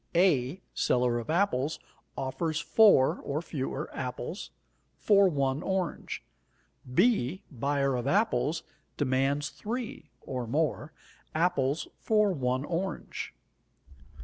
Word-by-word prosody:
A, 170 -2 +3
seller 125 -1 +2
of 120 - -8
apples, 160 -5 +1 0.4
offers 155 +4 -1
4 195 -8 +5
(or 140 +2 -1
fewer) 145 -2 -3
apples 125 - -4 0.5
for 200 -2 +5
1 140 -2 0
orange. 190 -3 -2 0.7
B, 185 - +2
buyer 140 +1 0
of 125 +1 -2
apples, 180 -4 +1 0.3
demands 140 +1 +1
3 225 -7 -5
(or 125 -3 -4
more) 150 +2 0 0.4
apples 155 -3 +1
for 210 -2 +3
1 130 -2 -1
orange. 180 +4 -4
145 Hz, 100 wpm, -29 LUFS, 130-185 Hz, 0.7 s, 4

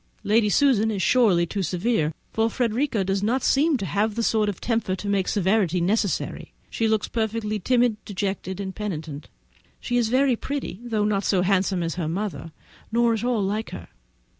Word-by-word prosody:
Lady 215 0 +3
Susan 225 -3 +3
is 210 -3 -2
surely 205 -9 +4
too 200 +4 -3
severe, 180 -3 0 0.2
for 225 0 +2
Frederica 235 -2 0
does 195 +1 -1
not 240 +5 0
seem 290 +1 +3
to 200 - -4
have 205 +2 0
the 230 - -1
sort 215 -2 +2
of 200 - -5
temper 225 -5 -1
to 200 - -7
make 200 -2 +1
severity 190 -3 +1
necessary. 200 +2 -1 0.2
She 225 - 0
looks 220 -1 +1
perfectly 220 -1 -2
timid, 240 +1 +1
dejected, 190 -1 -4
and 190 -1 -4
penitent. 160 -8 -5 0.5
She 245 - -1
is 235 -2 +1
very 260 +1 +3
pretty, 270 -6 -5
though 220 -3 0
not 205 -1 0
so 185 -2 +2
handsome 190 -1 +1
as 165 -1 -2
her 160 - -2
mother, 180 -1 -4 0.4
nor 235 0 +3
at 225 0 -2
all 240 -4 +1
like 210 +3 -2
her. 85 - -9
210 Hz, 185 wpm, -24 LUFS, 190-230 Hz, 0.5 s, surely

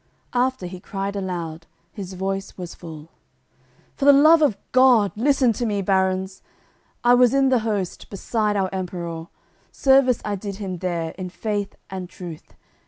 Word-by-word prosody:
After, 255 -4 0
he 180 +1 -7
cried 195 +2 -4
aloud; 170 -4 -4 0.2
his 190 -2 -7
voice 195 +1 -4
was 175 -2 -7
full: 160 -2 -10 0.8
"For 285 0 +5
th' - - +6
Love 315 +3 +7
of 275 -10 +3
God, 250 -6 +5
listen 255 +1 +3
to 240 - -3
me, 205 -2 -1
baruns! 190 0 0 0.6
I 240 0 +6
was 245 +1 +5
in 270 -1 +3
th' 250 -3 +3
host, 205 -5 -3
beside 210 +1 -1
our 190 -2 0
Emperour, 170 -3 -5 0.4
Service 265 -3 +4
I 210 - -1
did 200 0 -6
him 190 -3 -5
there 170 -3 -2
in 185 -1 -4
faith 205 +1 -3 0.2
and 185 -2 -5
truth. 175 -4 -10
195 Hz, 160 wpm, -23 LUFS, 180-240 Hz, 0.8 s, Love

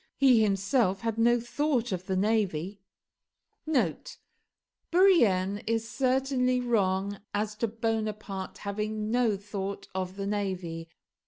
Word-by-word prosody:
He 255 -5 +5
himself 195 0 +1
had 225 -1 -2
no 240 +1 +4
thought 245 0 -1
of 185 0 -4
the 190 - 0
navy. 195 -2 0 2.1
[Bourrienne 220 - +4
is 225 0 0
certainly 255 0 +1
wrong 200 -4 0 0.2
as 210 +1 -1
to 230 - 0
Bonaparte 215 -3 -3
having 210 +1 -3
no 235 -4 +2
thought 200 0 -5
of 185 0 -3
the 195 0 -4
navy. 185 -5 -3
210 Hz, 110 wpm, -28 LUFS, 195-235 Hz, 2.1 s, He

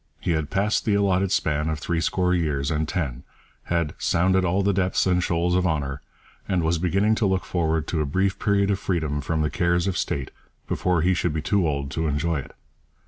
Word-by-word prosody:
He - - -1
had 80 -2 -1
passed 105 +2 +1
the 105 - +1
allotted 95 -2 +2
span 75 -2 0
of 80 - -1
threescore 85 +3 0
years 75 -5 0
and 80 0 0
ten, 65 -8 -2 0.4
had 85 -3 -1
'sounded 95 +2 +2
all 95 +2 +1
the 100 +1 +2
depths 95 0 +1
and 90 -1 +2
shoals 85 0 0
of 90 0 +2
honour,' 70 -4 -2 0.5
and 90 -3 +1
was 80 +1 +1
beginning 95 +5 +2
to 110 -2 +1
look 95 -1 0
forward 80 -3 0
to 80 - 0
a - - 0
brief 95 +6 0
period 100 -1 +2
of 95 - 0
freedom 80 -6 -1
from 80 +3 -1
the 75 - -1
cares 85 +3 +1
of 95 -2 -1
state 70 -2 -2 0.4
before 90 -3 0
he 95 +2 +3
should 85 -2 -1
be 80 - -2
too 100 -2 +2
old 70 -2 -2
to 80 +1 -1
enjoy 75 +2 0
it. - - -10
85 Hz, 210 wpm, -24 LUFS, 75-95 Hz, 0.5 s, he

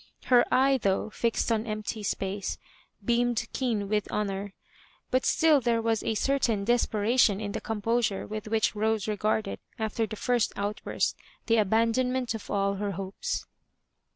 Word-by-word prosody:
"Her 245 -2 +5
eye, 270 +1 +4
though. 200 +1 0
fixed 230 +1 0
on 225 0 0
empty 215 0 -4
space, 200 0 -2 0.5
beamed 240 -1 +1
keen 225 -6 -1
with 210 0 -1
honour;" 200 -1 -2 0.6
but 255 0 +2
still 310 -3 +4
there 235 -1 +2
was 225 -1 0
a 220 - -1
certain 230 -4 +1
desperation 225 -2 +3
in 205 -1 -4
the - - -4
composure 225 -1 0
with 215 0 -6
which 220 0 +1
Rosa 220 0 0
regarded, 215 +1 -1 0.2
after 220 0 -1
the 215 - -6
first 245 +1 0
outbursti 205 +1 -1 0.3
th« 230 -1 +3
abaadonmentof 230 +3 +1
all 200 0 0
her 200 0 -2
hopes. 190 +2 -4
220 Hz, 145 wpm, -28 LUFS, 205-235 Hz, 0.6 s, Her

